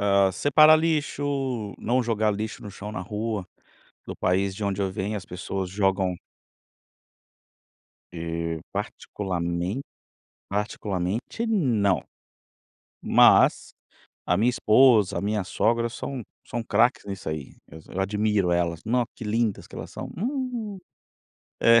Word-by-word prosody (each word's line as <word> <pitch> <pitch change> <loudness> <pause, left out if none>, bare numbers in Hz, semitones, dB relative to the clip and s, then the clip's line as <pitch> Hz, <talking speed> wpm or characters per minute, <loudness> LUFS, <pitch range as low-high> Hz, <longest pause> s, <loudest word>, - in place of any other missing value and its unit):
hã, 100 -1 +4
separar 155 - +6
lixo, 155 -3 0 0.5
não 125 +2 +1
jogar 110 -2 +1
lixo 110 +2 -5
no 105 - -7
chão, 105 +2 -7
na 105 - -5
rua. 105 -3 -3 0.6
Do - - -6
país 95 +1 +1
de 105 +1 -4
onde 100 0 -1
eu 95 - 0
venho 100 +3 -2
as 95 - -7
pessoas 95 +1 -4
jogam 95 -2 +1 1.9
E, 85 -1 -3
particularmen 90 +2 -3 0.7
particularmente 105 - -2
não. 120 - +2 1.0
Mas - - +5 0.6
a 90 - +3
minha 115 +5 +3
esposa, 110 -5 +4
a - - -1
minha 105 0 -1
sogra 115 +5 +1
são 130 +2 -5 0.2
são 120 - -3
craques 120 +2 +2
nisso 100 -4 -6
aí, 75 -3 -5
eu 80 +4 -7
admiro 105 -1 +1
elas, 85 -2 0
nó 120 +2 +2
que - - -11
lindas 110 0 0
que - - -11
elas - - -7
são. - - -7
Hum. 240 -3 -3 0.8
É. 115 0 +7
105 Hz, 125 wpm, -25 LUFS, 95-120 Hz, 1.9 s, É